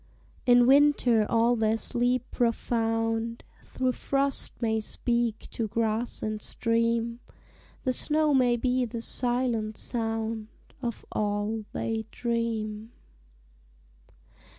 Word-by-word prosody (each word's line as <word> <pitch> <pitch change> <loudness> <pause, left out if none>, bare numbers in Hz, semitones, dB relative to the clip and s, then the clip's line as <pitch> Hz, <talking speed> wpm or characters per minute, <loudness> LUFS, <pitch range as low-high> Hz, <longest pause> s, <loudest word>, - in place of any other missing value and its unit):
In 245 0 +6
winter 260 -5 +4
all 235 +1 +3
their 220 -1 +1
sleep 245 +2 0
profound 225 -1 -1 0.2
Through 255 -1 -1
frost 275 +2 0
may 220 -2 0
speak 235 +1 -1
to 225 - -2
grass 225 +2 -1
and 215 -1 -3
stream; 230 +1 0 0.6
The 255 - +1
snow 305 +3 +2
may 250 -3 +4
be 255 +1 +1
the 230 0 -5
silent 240 -3 +1
sound 225 -2 -1 0.3
Of 235 -3 -4
all 210 +1 -1
they 225 -1 -3
dream. 225 -2 -3
230 Hz, 105 wpm, -27 LUFS, 220-245 Hz, 0.6 s, In